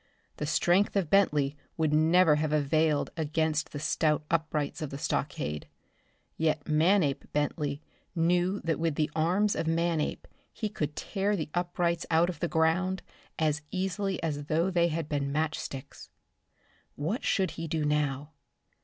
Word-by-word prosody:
The 150 Hz, -, -3 dB
strength 175 Hz, +7 st, +2 dB
of 190 Hz, -6 st, 0 dB
Bentley 150 Hz, -8 st, +3 dB, 0.2 s
would 155 Hz, -2 st, +1 dB
never 160 Hz, 0 st, +5 dB
have 155 Hz, 0 st, 0 dB
availed 150 Hz, 0 st, +2 dB
against 155 Hz, -1 st, 0 dB
the -, -, -5 dB
stout 150 Hz, +1 st, +1 dB
uprights 155 Hz, -3 st, -1 dB
of 155 Hz, -, -3 dB
the 140 Hz, -, -6 dB
stockade. 75 Hz, -, -2 dB, 0.7 s
Yet 155 Hz, -2 st, 0 dB
Manape 155 Hz, -1 st, +2 dB
Bentley 145 Hz, 0 st, -1 dB, 0.3 s
knew 175 Hz, +4 st, +2 dB
that 165 Hz, -1 st, -1 dB
with 165 Hz, -2 st, 0 dB
the 155 Hz, 0 st, 0 dB
arms 185 Hz, +6 st, +2 dB
of 165 Hz, -, -2 dB
Manape 165 Hz, -1 st, 0 dB, 0.2 s
he 215 Hz, -2 st, -3 dB
could 150 Hz, -8 st, -3 dB
tear 200 Hz, +1 st, -1 dB
the 155 Hz, -5 st, -3 dB
uprights 175 Hz, -1 st, -1 dB
out 165 Hz, +1 st, +3 dB
of 165 Hz, -, -12 dB
the 175 Hz, -, 0 dB
ground 175 Hz, +3 st, +1 dB, 0.3 s
as 150 Hz, -2 st, +1 dB
easily 190 Hz, 0 st, -1 dB
as 145 Hz, -3 st, -2 dB
though 165 Hz, +5 st, +1 dB
they 170 Hz, -1 st, +3 dB
had 165 Hz, -2 st, -2 dB
been 140 Hz, -2 st, -1 dB
match 155 Hz, +2 st, 0 dB
sticks. 135 Hz, -1 st, -8 dB, 0.9 s
What 170 Hz, -, -2 dB
should 190 Hz, -4 st, +1 dB
he 165 Hz, 0 st, -5 dB
do 155 Hz, -1 st, -1 dB
now? 145 Hz, -1 st, 0 dB
160 Hz, 155 wpm, -29 LUFS, 150-175 Hz, 0.9 s, never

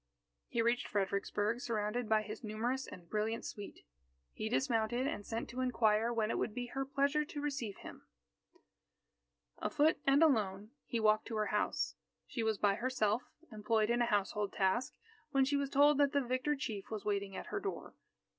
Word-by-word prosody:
He 230 Hz, -, 0 dB
reached 235 Hz, +1 st, +1 dB
Fredericksburg 205 Hz, +3 st, 0 dB
surrounded 225 Hz, -1 st, -2 dB
by 215 Hz, -1 st, +4 dB
his 215 Hz, +2 st, -7 dB
numerous 235 Hz, +5 st, -2 dB
and 175 Hz, -2 st, -11 dB
brilliant 220 Hz, +3 st, -1 dB
suite. 205 Hz, -1 st, -8 dB, 0.5 s
He 215 Hz, -, -3 dB
dismounted, 240 Hz, 0 st, +1 dB
and 210 Hz, -7 st, -2 dB
sent 225 Hz, +2 st, -4 dB
to 255 Hz, +2 st, -3 dB
inquire 225 Hz, -2 st, +2 dB
when 225 Hz, -2 st, 0 dB
it -, -, -1 dB
would 215 Hz, -, -2 dB
be 245 Hz, -1 st, -2 dB
her 270 Hz, 0 st, -1 dB
pleasure 280 Hz, +2 st, +2 dB
to 295 Hz, 0 st, -7 dB
receive 275 Hz, -9 st, -3 dB
him. -, -, -11 dB, 1.5 s
Afoot 310 Hz, +1 st, +2 dB
and 275 Hz, +3 st, +6 dB
alone, 210 Hz, -7 st, +2 dB, 0.2 s
he 235 Hz, -, -1 dB
walked 215 Hz, 0 st, +3 dB
to 230 Hz, -, -4 dB
her 215 Hz, 0 st, +1 dB
house. 210 Hz, -, 0 dB, 0.3 s
She 235 Hz, -, -4 dB
was 220 Hz, -2 st, +1 dB
by 200 Hz, -1 st, +3 dB
herself, 235 Hz, -1 st, +1 dB, 0.3 s
employed 215 Hz, +1 st, +1 dB
in 240 Hz, 0 st, +2 dB
a 240 Hz, -, +3 dB
household 205 Hz, -1 st, 0 dB
task, 200 Hz, +6 st, +1 dB, 0.3 s
when 275 Hz, -2 st, +3 dB
she 280 Hz, +2 st, +1 dB
was 280 Hz, -1 st, 0 dB
told 285 Hz, +1 st, +5 dB
that 285 Hz, -1 st, +4 dB
the 285 Hz, -, +3 dB
victor 255 Hz, +4 st, 0 dB
chief 220 Hz, -9 st, -5 dB
was 215 Hz, -2 st, -5 dB
waiting 200 Hz, -2 st, -1 dB
at -, -, -5 dB
her -, -, 0 dB
door. 395 Hz, 0 st, -5 dB
230 Hz, 180 wpm, -35 LUFS, 210-265 Hz, 1.5 s, and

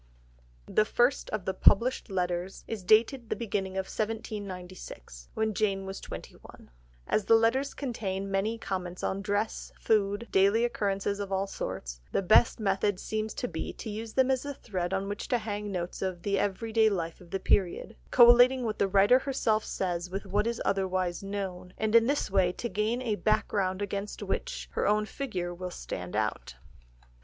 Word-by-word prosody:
The 215 Hz, -, +3 dB
first 240 Hz, +4 st, +1 dB
of 210 Hz, -4 st, -3 dB
the 190 Hz, -, 0 dB
published 240 Hz, +6 st, +4 dB
letters 180 Hz, 0 st, -2 dB
is 220 Hz, -4 st, -5 dB
dated 225 Hz, +5 st, +3 dB
the -, -, 0 dB
beginning 200 Hz, -5 st, -2 dB
of 190 Hz, 0 st, -2 dB
1796, 190 Hz, -, -6 dB
when 220 Hz, 0 st, 0 dB
Jane 195 Hz, -2 st, 0 dB
was 195 Hz, 0 st, -6 dB
twenty -, -, -8 dB
one. -, -, -16 dB, 0.3 s
As 210 Hz, -, 0 dB
the 225 Hz, -, +6 dB
letters 240 Hz, +5 st, +2 dB
contain 195 Hz, -7 st, -3 dB
many 205 Hz, +4 st, 0 dB
comments 185 Hz, -4 st, -4 dB
on 195 Hz, -, -1 dB
dress, 205 Hz, +1 st, -2 dB
food, 205 Hz, +1 st, +1 dB
daily 200 Hz, +5 st, +4 dB
occurrences 200 Hz, -3 st, -1 dB
of 200 Hz, -1 st, -4 dB
all 195 Hz, 0 st, +1 dB
sorts, -, -, -5 dB
the -, -, 0 dB
best 215 Hz, +6 st, +5 dB
method 200 Hz, -1 st, +1 dB
seems 215 Hz, 0 st, -3 dB
to -, -, -2 dB
be 160 Hz, -2 st, -5 dB
to 220 Hz, -, -7 dB
use 220 Hz, +1 st, -6 dB
them 260 Hz, 0 st, +3 dB
as 260 Hz, -1 st, 0 dB
a 285 Hz, -1 st, -5 dB
thread 185 Hz, -7 st, -3 dB
on 195 Hz, 0 st, -1 dB
which 205 Hz, 0 st, -4 dB
to 250 Hz, -, +2 dB
hang 210 Hz, -2 st, -4 dB
notes 180 Hz, -2 st, -4 dB
of 185 Hz, -2 st, -3 dB
the 200 Hz, -1 st, +1 dB
everyday 220 Hz, +3 st, +2 dB
life 170 Hz, -5 st, -3 dB
of 175 Hz, -, -15 dB
the 195 Hz, -, -2 dB
period, 195 Hz, +4 st, +1 dB
collating 245 Hz, +1 st, +7 dB
what 215 Hz, -2 st, -3 dB
the 200 Hz, -, +3 dB
writer 200 Hz, +6 st, +5 dB
herself 245 Hz, -5 st, 0 dB
says 175 Hz, -1 st, -2 dB
with 195 Hz, +2 st, -4 dB
what 205 Hz, +3 st, 0 dB
is 235 Hz, 0 st, -2 dB
otherwise 185 Hz, -2 st, 0 dB
known, 190 Hz, -2 st, -5 dB
and 220 Hz, 0 st, -1 dB
in 230 Hz, 0 st, +6 dB
this 285 Hz, -7 st, 0 dB
way 190 Hz, -2 st, +3 dB
to 235 Hz, -, -4 dB
gain 220 Hz, +5 st, -1 dB
a 225 Hz, -4 st, 0 dB
background 205 Hz, -3 st, 0 dB
against 200 Hz, +1 st, -4 dB
which -, -, -3 dB
her -, -, 0 dB
own 210 Hz, +1 st, +3 dB
figure 190 Hz, -9 st, -4 dB
will 180 Hz, +1 st, -5 dB
stand 90 Hz, -, -6 dB
out. 105 Hz, 0 st, -2 dB
200 Hz, 180 wpm, -29 LUFS, 190-225 Hz, 0.3 s, collating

